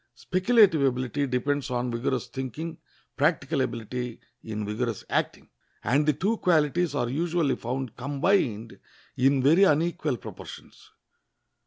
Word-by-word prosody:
Speculative 185 -3 +3
ability 130 +2 0
depends 135 +3 -1
on 125 0 -1
vigorous 120 +1 -1
thinking, 135 +6 -6 0.4
practical - - +1
ability 120 +1 -4 0.2
in 110 -1 -5
vigorous 110 +1 -3
acting, - - -1 0.4
and 145 +4 +2
the 150 - +4
two 205 - 0
qualities 170 -1 +2
are 120 - 0
usually 160 +3 0
found 125 0 -4
combined 135 - 0 0.4
in 135 +1 +3
very 165 +8 +5
unequal 155 -4 +1
proportions. - - -11
135 Hz, 120 wpm, -26 LUFS, 125-160 Hz, 0.4 s, very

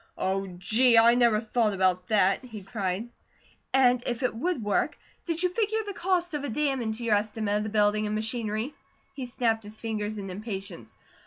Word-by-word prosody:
"Oh, 195 +1 -1
gee! 230 +6 +4
I 230 +1 +7
never 235 -3 +4
thought 220 -1 0
about 185 -1 +1
that!" 200 -1 +2
he 220 -5 -9
cried. 195 +1 -3 0.6
"And 250 -2 +4
if 240 +1 -2
it 250 - +1
would 260 +2 -2
work, 205 - 0 0.3
did 335 0 -1
you 360 - +3
figure 440 +3 0
the 405 - -5
cost 355 -2 0
of 295 -1 -3
a 285 - -3
dam 275 +1 0
into 220 +1 -3
your 225 - +2
estimate 210 0 0
of - - -1
the 215 - -3
building 210 0 +2
and 210 - -2
machinery?" 220 +3 -1 0.4
He 260 -3 -6
snapped 230 -2 0
his 210 +1 -8
fingers 215 -1 -3
in 195 -2 -6
impatience. 190 - -7
220 Hz, 190 wpm, -27 LUFS, 205-250 Hz, 0.6 s, I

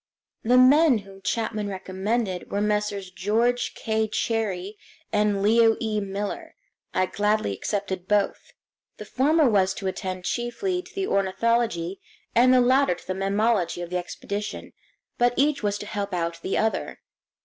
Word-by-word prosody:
The 245 +3 +3
men 275 +2 +6
whom 195 0 -14
Chapman 215 0 -2
recommended 190 +1 -3
were 200 - 0
Messrs. 210 -2 -1
George 225 +6 0
K. 220 -1 -1
Cherrie 215 -3 -2 0.4
and 205 -1 +2
Leo 225 +1 +5
E. 215 -2 -1
Miller. 200 0 -5 0.4
I 185 - +1
gladly 210 - 0
accepted 190 - -3
both. 205 -1 0 0.5
The - - -8
former 300 +3 +3
was 195 -4 +2
to 195 - -7
attend 185 -1 -4
chiefly 360 +11 -2
to - - -17
the 390 -1 -1
ornithology 195 - 0 0.3
and 250 +2 +5
the 255 -1 +6
latter 260 -4 +3
to 170 - -16
the 185 - -1
mammalogy 195 -2 0
of 175 - -8
the 180 - 0
expedition; 200 +3 -5 0.5
but 245 0 +3
each 290 +1 +2
was 205 -1 0
to 210 - -7
help 200 -2 -3
out 170 -1 -3
the 190 - -1
other. 220 0 -1
210 Hz, 150 wpm, -25 LUFS, 190-235 Hz, 0.5 s, men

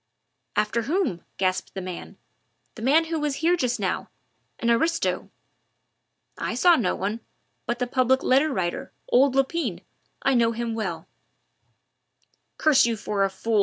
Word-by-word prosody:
"After 215 +2 +1
whom?" 280 - -1
gasped 185 0 -1
the - - -3
man. 180 -1 -7 0.6
"The 220 - -11
man 295 +7 +4
who 325 0 -2
was 295 -2 -1
here 335 +4 +2
just 250 -7 -1
now - - -2 0.5
an 235 - +1
aristo." 325 +9 +1 1.1
"I - - -2
saw 350 -1 +6
no 215 - 0
one 205 +4 -2 0.5
but 240 0 -1
the 250 - 0
Public 255 +1 +2
Letter 275 +4 +3
Writer, 175 -8 -2 0.2
old 260 +1 +4
Lepine 270 - 0 0.4
I 270 - +3
know 230 -2 +3
him 230 0 -3
well 225 -1 -4 0.8
" - - -46
"Curse 300 -6 +5
you 230 -1 -1
for 205 -2 -1
a 195 - +2
fool!" 215 +3 0
240 Hz, 155 wpm, -25 LUFS, 215-285 Hz, 1.1 s, saw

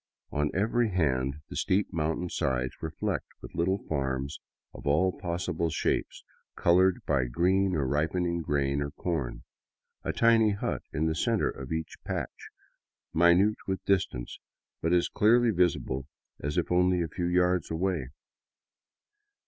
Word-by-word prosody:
On 75 +1 0
every 115 +4 +2
hand 70 -6 0
the - - -7
steep 95 +2 +1
mountain 80 +2 -1
sides 65 -5 -1
were - - -3
flecked - - -3
with - - -11
little 95 +3 0
farms 70 0 -2 0.3
of - - -9
all 80 +6 +3
possible 85 -1 -2
shapes, - - -1 0.3
colored 90 +2 +3
by 70 -4 +2
green 95 +9 +2
or 70 -3 0
ripening 85 +5 0
grain 70 -2 0
or 70 - -2
corn, 70 -7 -3 0.6
a - - -1
tiny 115 -2 +4
hut 100 - -2
in 75 +3 0
the 80 - +1
center 115 +6 +1
of 65 -1 -9
each 80 0 -3
patch, - - -5 0.6
minute 85 +6 +5
with 95 -1 -3
distance, 90 -11 0 0.4
but 80 - 0
as 90 -1 +3
clearly 120 +2 +4
visible 80 -8 0 0.3
as 75 +5 -3
if 90 - 0
only 90 0 +3
a - - -2
few 85 +3 -3
yards 90 -1 +2
away. 85 -4 -1
85 Hz, 145 wpm, -29 LUFS, 70-95 Hz, 0.6 s, minute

